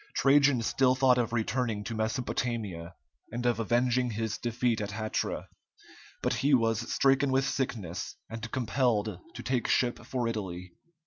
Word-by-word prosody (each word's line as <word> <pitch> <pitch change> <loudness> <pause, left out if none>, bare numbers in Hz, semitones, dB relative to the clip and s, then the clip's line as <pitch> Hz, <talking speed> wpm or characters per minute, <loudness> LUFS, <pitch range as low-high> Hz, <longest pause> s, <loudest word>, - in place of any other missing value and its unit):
Trajan 140 -3 +4
still 130 +2 +3
thought 130 -1 +4
of 115 -1 0
returning 115 -2 -1
to 115 - -5
Mesopotamia, 110 -6 -2 0.4
and 120 +2 -4
of 120 -2 +2
avenging 120 +2 +2
his 110 -1 -3
defeat 120 -1 0
at 100 - -3
Hatra, 110 +1 -2 0.8
but - - +1
he 140 0 +5
was 115 -1 0
stricken 135 0 +3
with 135 +1 +2
sickness 105 -11 -3
and 115 0 -6
compelled 120 -3 0 0.2
to - - -7
take 130 -2 0
ship 120 -1 +1
for 120 0 -2
Italy. 90 -5 -5
120 Hz, 145 wpm, -29 LUFS, 110-130 Hz, 0.8 s, he